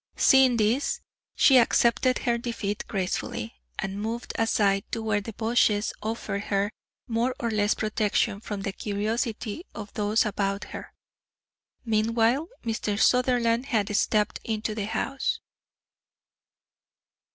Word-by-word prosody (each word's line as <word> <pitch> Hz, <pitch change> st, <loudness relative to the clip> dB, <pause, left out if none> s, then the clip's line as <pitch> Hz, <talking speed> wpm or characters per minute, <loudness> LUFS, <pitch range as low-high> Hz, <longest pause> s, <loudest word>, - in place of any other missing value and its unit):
Seeing 265 Hz, -2 st, +5 dB
this, 225 Hz, +6 st, +1 dB, 0.4 s
she 265 Hz, -2 st, +7 dB
accepted 240 Hz, +1 st, +3 dB
her 235 Hz, -1 st, +2 dB
defeat 225 Hz, -4 st, -3 dB
gracefully, 115 Hz, -, -3 dB, 0.2 s
and 195 Hz, +1 st, -3 dB
moved 230 Hz, +3 st, -4 dB
aside 200 Hz, -3 st, +2 dB
to 225 Hz, -, -3 dB
where 215 Hz, -2 st, +1 dB
the 225 Hz, +2 st, -7 dB
bushes 220 Hz, -2 st, +2 dB
offered 210 Hz, -2 st, -3 dB
her 200 Hz, +1 st, 0 dB, 0.4 s
more 240 Hz, +2 st, 0 dB
or 235 Hz, -2 st, -1 dB
less 210 Hz, -1 st, +2 dB
protection 215 Hz, -1 st, 0 dB
from 205 Hz, -3 st, -5 dB
the 195 Hz, -, -2 dB
curiosity 215 Hz, -, -2 dB
of 210 Hz, -2 st, -8 dB
those 210 Hz, +2 st, +2 dB
about 200 Hz, -1 st, -1 dB
her. -, -, -9 dB, 0.9 s
Meanwhile 230 Hz, +6 st, +2 dB, 0.2 s
Mr. 220 Hz, -2 st, -1 dB
Sutherland 245 Hz, 0 st, +3 dB
had 210 Hz, -4 st, 0 dB
stepped 210 Hz, +1 st, +1 dB
into 215 Hz, -1 st, -2 dB
the 210 Hz, -1 st, -3 dB
house. 270 Hz, +4 st, -1 dB
220 Hz, 120 wpm, -26 LUFS, 205-235 Hz, 0.9 s, she